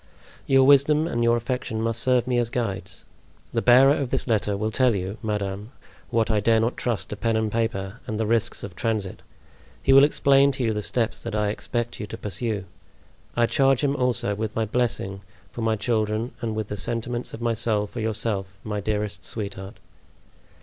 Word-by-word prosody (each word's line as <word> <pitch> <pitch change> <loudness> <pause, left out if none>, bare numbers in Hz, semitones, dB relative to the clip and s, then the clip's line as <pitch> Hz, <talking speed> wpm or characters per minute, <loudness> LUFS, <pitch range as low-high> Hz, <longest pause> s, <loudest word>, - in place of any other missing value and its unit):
Your 135 -1 +5
wisdom 145 +3 +5
and 120 -8 -1
your 115 0 +4
affection 120 -1 -3
must 115 +1 0
serve 125 -1 +3
me 125 -1 +1
as 120 -1 0
guides. 115 -6 -4 0.5
The 115 - +1
bearer 130 +4 +6
of 140 -3 -2
this - - -1
letter 105 -3 +1
will 110 +2 -1
tell 125 -1 +3
you, 95 +2 -4
madame, 105 +2 -3 0.4
what 115 -1 +1
I 110 - +2
dare 110 +2 +3
not 115 +2 0
trust 110 -6 -2
to - - -4
pen 115 +2 0
and 110 -1 0
paper 110 -2 -2
and 110 0 -3
the 110 - +1
risks 115 0 0
of 95 -4 -7
transit. 105 -2 -2 0.6
He 135 - +4
will 135 +1 +9
explain 140 -1 +4
to 130 - -2
you 110 -2 +1
the 105 - -2
steps 115 +2 -1
that 115 -2 -4
I 105 -1 +1
expect 120 +2 -3
you 105 - -5
to - - -7
pursue. 105 0 -3 0.7
I 120 - +4
charge 135 +1 +2
him 140 0 +2
also 125 -4 0
with 110 +1 -4
my 110 - +1
blessing 105 -4 -1 0.3
for 120 - -6
my 110 -1 +1
children 110 +1 -1
and 110 -2 -2
with 110 -2 -3
the 105 - -4
sentiments 120 +2 -3
of - - -10
my 120 -1 0
soul 110 -2 +1
for 115 - -8
yourself, 105 -3 -2
my 105 -1 -3
dearest 105 -1 -3
sweetheart." 100 -2 -5
115 Hz, 200 wpm, -24 LUFS, 105-120 Hz, 0.7 s, will